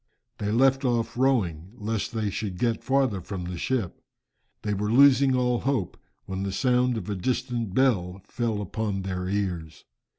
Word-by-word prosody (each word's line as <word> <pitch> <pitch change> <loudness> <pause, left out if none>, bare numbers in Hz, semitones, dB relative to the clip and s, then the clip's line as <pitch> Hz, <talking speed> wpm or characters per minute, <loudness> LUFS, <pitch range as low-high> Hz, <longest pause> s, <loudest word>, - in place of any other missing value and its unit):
They 105 0 -1
left 135 +4 +3
off 115 -2 0
rowing, 100 -9 +1
lest 110 -1 -3
they 110 -3 -1
should 100 -3 -4
get 115 +2 0
farther 130 -8 +1
from 95 0 -5
the 90 0 -5
ship. 120 -9 -2 0.6
They 105 -1 -1
were 105 +1 -1
losing 135 +1 +6
all 125 -1 +1
hope 130 -9 -1 0.3
when 95 0 -4
the 100 0 -2
sound 125 +2 +2
of 95 - -5
a 105 - -1
distant 120 0 -2
bell 95 -9 +2
fell 110 -3 -2
upon 100 0 -3
their 90 -1 -3
ears. 90 -6 -3
110 Hz, 165 wpm, -26 LUFS, 95-125 Hz, 0.6 s, losing